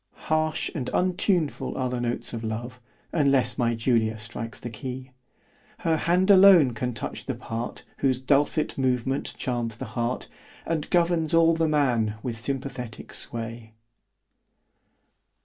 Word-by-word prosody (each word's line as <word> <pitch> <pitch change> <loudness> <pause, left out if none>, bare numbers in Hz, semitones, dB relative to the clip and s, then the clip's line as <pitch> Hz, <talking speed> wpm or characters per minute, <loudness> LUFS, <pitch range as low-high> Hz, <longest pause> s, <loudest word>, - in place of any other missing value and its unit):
O - - -52
D - - -38
E. - - -17
Harsh 155 0 0
and 130 -5 -3
untuneful 180 -3 0
are 130 - 0
the 125 -1 -2
notes 120 0 -2
of 115 -1 -4
love, 120 +3 -5 0.3
Unless 135 -5 +2
my 120 -1 +2
Julia 115 -1 +1
strikes 115 0 -7
the 120 - -6
key, 130 +3 -7 0.7
Her 165 -1 +3
hand 180 +5 +3
alone 185 -9 +8
can 125 +1 -3
touch - - -5
the - - -2
part, 115 +1 -5
Whose 130 -2 +2
dulcet 140 +3 +1
movement 130 +1 0
charms 120 -3 -2
the 130 - -6
heart, 120 +2 -2 0.4
_And 160 -2 -2
governs 170 -2 +2
all 165 0 +5
the 165 0 +1
man 120 -8 +2
with 120 -3 -3
sympathetick 125 -1 -5
sway. 115 -1 -4
130 Hz, 150 wpm, -26 LUFS, 115-155 Hz, 0.7 s, alone